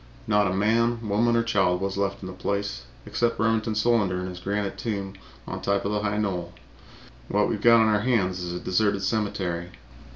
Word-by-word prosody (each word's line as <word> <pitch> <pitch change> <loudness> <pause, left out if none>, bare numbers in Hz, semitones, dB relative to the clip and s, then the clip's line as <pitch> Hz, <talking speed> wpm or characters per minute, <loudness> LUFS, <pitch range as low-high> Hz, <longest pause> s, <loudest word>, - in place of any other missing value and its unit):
Not 105 -1 +3
a - - 0
man, 115 +3 +1
woman 115 +4 +2
or 115 - +3
child 95 -6 +2
was 95 0 -2
left 100 0 -2
in - - -5
the 95 - -7
place 100 -9 -3 0.2
except 120 -2 0
Remington 110 0 +1
Solander 105 -4 +2
in 90 - -4
his 90 -1 -8
granite 100 +1 -2
tomb 100 -4 -4 0.3
on - - -6
top 100 0 0
of 100 - 0
the 105 0 0
high 105 0 -1
knoll. 90 -5 -2 0.7
What 105 0 +2
we've 105 - -2
got 115 0 +7
on 110 - +4
our 105 -1 +2
hands 100 -7 +1
is 90 -1 -4
a 90 - -4
deserted 100 +1 +1
cemetery. 95 -5 -1
100 Hz, 200 wpm, -25 LUFS, 95-110 Hz, 0.7 s, got